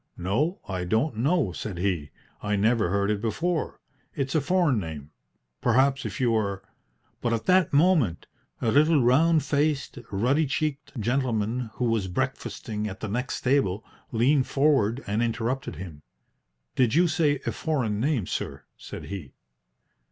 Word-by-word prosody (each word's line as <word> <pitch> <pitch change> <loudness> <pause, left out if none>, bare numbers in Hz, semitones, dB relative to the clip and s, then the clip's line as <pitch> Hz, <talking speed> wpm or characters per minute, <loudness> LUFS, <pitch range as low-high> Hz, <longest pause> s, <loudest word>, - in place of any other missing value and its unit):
"No, 135 - -1
I 95 -2 -3
don't 110 - 0
know," 140 - +2
said 95 +1 -6
he. 85 -5 -1 0.3
"I 105 0 0
never 110 -1 +2
heard 100 +2 +1
it 105 -1 -1
before. 160 - -1 0.4
It's 135 -2 -2
a 155 - +3
foreign 170 -6 +2
name. 80 -5 -7 0.5
Perhaps 135 +3 +2
if - - -7
you 125 -3 +2
were 100 -3 -1 0.3
" - - -42
But 120 -1 0
at 115 - -2
that 185 -1 +4
moment 145 - +3 0.4
a 115 - +2
little 150 +2 +4
round 155 +5 +4
faced, 145 -1 0
ruddy 130 +10 +2
cheeked 145 -1 -3
gentleman, 120 -1 0
who 125 - -1
was 115 -4 +1
breakfasting 105 +3 -3
at 95 -1 -7
the 110 - -4
next 125 +5 -2
table, 120 -7 +1 0.3
leaned 130 +4 +3
forward 135 -4 +2
and 105 +3 -1
interrupted 120 +3 -2
him. 85 -6 -9 0.7
"Did 125 -4 +2
you 175 +2 +5
say 155 -3 +1
a - - 0
foreign 125 -10 -1
name, 130 - +1
sir?" - - -4
said - - -8
he. 95 -9 -7
120 Hz, 155 wpm, -26 LUFS, 105-145 Hz, 0.7 s, you